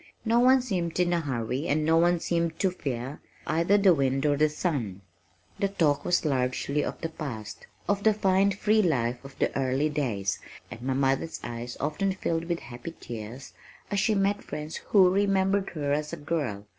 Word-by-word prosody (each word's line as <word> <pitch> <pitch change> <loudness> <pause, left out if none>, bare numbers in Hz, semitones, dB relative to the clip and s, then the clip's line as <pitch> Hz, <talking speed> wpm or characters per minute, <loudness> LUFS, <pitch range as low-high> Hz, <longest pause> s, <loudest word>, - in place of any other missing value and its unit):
No 230 +1 +3
one 255 +1 +5
seemed 180 -8 -2
in 175 -1 +2
a 170 - +2
hurry 130 -1 -2
and 150 +1 +1
no 160 +1 +4
one 175 +1 +4
seemed 170 -1 -1
to 190 - +1
fear 135 -5 -4 0.3
either 170 +6 +3
the 195 -3 +6
wind 135 -2 +1
or 145 -1 +3
the 155 +2 +3
sun. 135 - -2 0.6
The 200 - +2
talk 160 -7 +1
was 175 -1 +1
largely 135 +1 0
of - - -4
the 165 - -2
past, 120 -10 -7 0.2
of 200 0 +1
the 220 - +5
fine 195 -1 +3
free 210 +2 +2
life 125 - 0
of 135 0 -12
the - - 0
"early 135 +3 +1
days" 110 -10 -1 0.3
and 115 - -8
my 130 +1 -1
mother's 135 +4 0
eyes 120 +1 -6
often 190 +6 0
filled 165 -3 -2
with 170 -1 -2
happy 125 +7 -8
tears 115 +3 -8 0.4
as 200 - +1
she 215 +1 +2
met 200 +1 +1
friends 150 +1 -6
who 195 -3 +4
remembered 195 0 +2
her 145 -2 0
as 150 +1 -1
a - - -5
girl. 145 -10 -3
155 Hz, 190 wpm, -27 LUFS, 135-190 Hz, 0.6 s, the